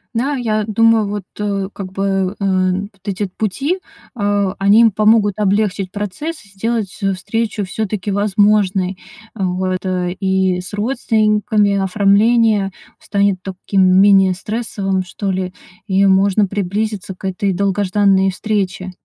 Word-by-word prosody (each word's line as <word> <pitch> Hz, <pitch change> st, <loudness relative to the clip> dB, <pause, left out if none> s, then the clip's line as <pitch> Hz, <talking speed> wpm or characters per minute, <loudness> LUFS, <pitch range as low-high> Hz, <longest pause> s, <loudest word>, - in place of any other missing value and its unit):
Да, 270 Hz, +5 st, 0 dB
я 215 Hz, -4 st, -1 dB
думаю 225 Hz, 0 st, +3 dB
вот, 205 Hz, 0 st, -4 dB, 0.2 s
э, 200 Hz, -2 st, -2 dB
как 190 Hz, -2 st, -8 dB
бы, 195 Hz, 0 st, -1 dB
э, -, -, -6 dB
н 185 Hz, 0 st, 0 dB
вот 195 Hz, -, -31 dB
эти 200 Hz, 0 st, -2 dB
пути, 275 Hz, -, -1 dB, 0.3 s
а 205 Hz, -4 st, 0 dB
они 200 Hz, +3 st, +5 dB
им 230 Hz, -1 st, +5 dB
помогут 210 Hz, -1 st, +3 dB
облегчить 200 Hz, -1 st, 0 dB
процесс. 210 Hz, -, -5 dB
Сделать, 200 Hz, 0 st, -3 dB
э, 195 Hz, -1 st, +1 dB
встречу 210 Hz, +3 st, -2 dB
всё-таки 205 Hz, 0 st, -3 dB
возможной, 200 Hz, -2 st, +1 dB, 0.4 s
а, 195 Hz, -4 st, -2 dB
вот, 185 Hz, 0 st, -1 dB
и 185 Hz, 0 st, 0 dB
с 180 Hz, +3 st, -8 dB
родственниками, 215 Hz, -2 st, +1 dB
оформление 205 Hz, +2 st, +3 dB, 0.3 s
станет 200 Hz, -2 st, 0 dB
таким 190 Hz, +1 st, 0 dB, 0.2 s
менее 195 Hz, -2 st, +5 dB
стрессовым 195 Hz, -1 st, -3 dB
что 195 Hz, +2 st, -4 dB
ли, 185 Hz, -1 st, -3 dB, 0.3 s
и 195 Hz, 0 st, +3 dB
можно 195 Hz, +2 st, +3 dB
приблизиться 200 Hz, 0 st, -3 dB
к -, -, -22 dB
этой 190 Hz, +1 st, -1 dB
долгожданной 195 Hz, 0 st, +2 dB
встрече. 190 Hz, -2 st, -2 dB
200 Hz, 130 wpm, -17 LUFS, 190-215 Hz, 0.4 s, они